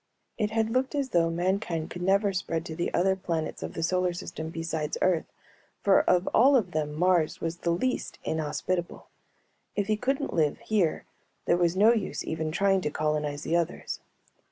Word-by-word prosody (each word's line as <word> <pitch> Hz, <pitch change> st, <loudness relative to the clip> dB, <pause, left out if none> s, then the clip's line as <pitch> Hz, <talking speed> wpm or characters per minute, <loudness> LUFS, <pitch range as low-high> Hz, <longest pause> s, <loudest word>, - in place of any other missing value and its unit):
It 210 Hz, -2 st, 0 dB
had 220 Hz, 0 st, 0 dB
looked 255 Hz, +3 st, 0 dB
as 280 Hz, -2 st, -1 dB
though 170 Hz, -4 st, +3 dB
mankind 175 Hz, -1 st, -1 dB
could 175 Hz, -, -6 dB
never 195 Hz, +2 st, +2 dB
spread 165 Hz, -3 st, -2 dB
to 160 Hz, -, -6 dB
the 175 Hz, -, -2 dB
other 190 Hz, +2 st, +2 dB
planets 165 Hz, -4 st, -3 dB
of -, -, -6 dB
the 165 Hz, -, -2 dB
solar 180 Hz, +1 st, +1 dB
system 160 Hz, -2 st, -6 dB
besides 160 Hz, -2 st, -3 dB
Earth 180 Hz, -3 st, +1 dB, 0.5 s
for -, -, +5 dB
of 180 Hz, +1 st, +3 dB
all 270 Hz, +5 st, +6 dB
of 205 Hz, -8 st, +2 dB
them 150 Hz, -2 st, -2 dB
Mars 175 Hz, -1 st, +2 dB
was 165 Hz, +1 st, -3 dB
the 175 Hz, -, -2 dB
least 250 Hz, +10 st, -1 dB
inhospitable; 160 Hz, +3 st, -2 dB, 0.7 s
if 205 Hz, -, 0 dB
he 215 Hz, +1 st, +1 dB
couldn't 270 Hz, +5 st, -1 dB
live 155 Hz, -3 st, +2 dB
here 195 Hz, -7 st, 0 dB, 0.4 s
there -, -, +4 dB
was 175 Hz, 0 st, +2 dB
no 215 Hz, +4 st, +6 dB
use 225 Hz, -, -2 dB
even 160 Hz, -1 st, -2 dB
trying 195 Hz, +2 st, +2 dB
to 150 Hz, -, -1 dB
colonize 150 Hz, -1 st, -1 dB
the 165 Hz, -, 0 dB
others. 170 Hz, -2 st, -2 dB
175 Hz, 180 wpm, -28 LUFS, 160-200 Hz, 0.7 s, all